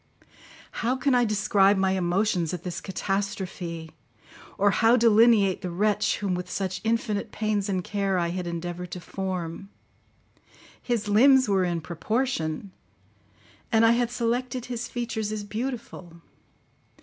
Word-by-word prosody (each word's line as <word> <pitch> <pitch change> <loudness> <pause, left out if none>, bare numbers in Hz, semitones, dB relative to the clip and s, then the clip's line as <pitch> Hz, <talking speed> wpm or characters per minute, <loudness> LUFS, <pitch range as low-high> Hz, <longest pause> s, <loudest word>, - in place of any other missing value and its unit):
How 240 +3 +1
can 265 +1 +1
I 245 -1 +4
describe 200 -1 +3
my 190 0 +2
emotions 180 -1 0
at 175 - -9
this 180 -2 -5
catastrophe, 190 -4 -4 0.7
or 200 +1 +4
how 225 +4 +4
delineate 225 -4 +4
the 180 - -4
wretch 210 +4 +1
whom 200 -3 -2
with 180 0 -4
such 190 -2 -3
infinite 225 -2 -1
pains 210 -2 -1
and 185 -2 -1
care 195 -1 -1
I 170 -1 0
had 180 0 -4
endeavoured 175 +1 -5
to 180 - -5
form? 185 0 -5 1.1
His 235 -3 -2
limbs 260 +5 +5
were 195 -2 +2
in 170 -2 -1
proportion, 180 - -2 1.0
and 225 0 +5
I 225 - +6
had 240 0 +1
selected 245 +1 -2
his 240 -1 -4
features 230 -3 -3
as 215 -1 -3
beautiful. 210 -6 -6
200 Hz, 135 wpm, -26 LUFS, 180-230 Hz, 1.1 s, I